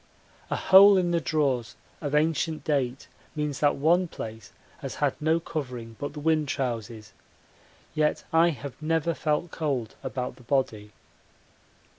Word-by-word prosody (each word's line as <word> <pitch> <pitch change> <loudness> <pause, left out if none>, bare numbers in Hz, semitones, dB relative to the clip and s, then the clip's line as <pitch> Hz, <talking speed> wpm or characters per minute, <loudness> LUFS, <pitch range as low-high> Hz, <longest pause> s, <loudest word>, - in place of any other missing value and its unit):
A - - 0
hole 195 +1 +7
in 175 -2 +1
the 170 -1 +1
drawers 130 -7 0 0.3
of 145 -1 -2
ancient 155 +1 +1
date 135 -3 -1 0.3
means 150 -2 -2
that 145 -1 +3
one 170 +6 +3
place 110 -7 -8 0.3
has - - -6
had - - +1
no 160 +2 +2
covering 125 -8 -6
but 145 0 -4
the 150 - -7
wind 155 0 +1
trousers, 115 -4 -4 0.8
yet 150 -1 +1
I 165 +1 +5
have 140 -3 -7
never 165 +1 +1
felt 155 +2 -1
cold 135 -8 -2
about 130 -1 -4
the - - -16
body. 115 -5 -1
145 Hz, 145 wpm, -27 LUFS, 125-160 Hz, 0.8 s, hole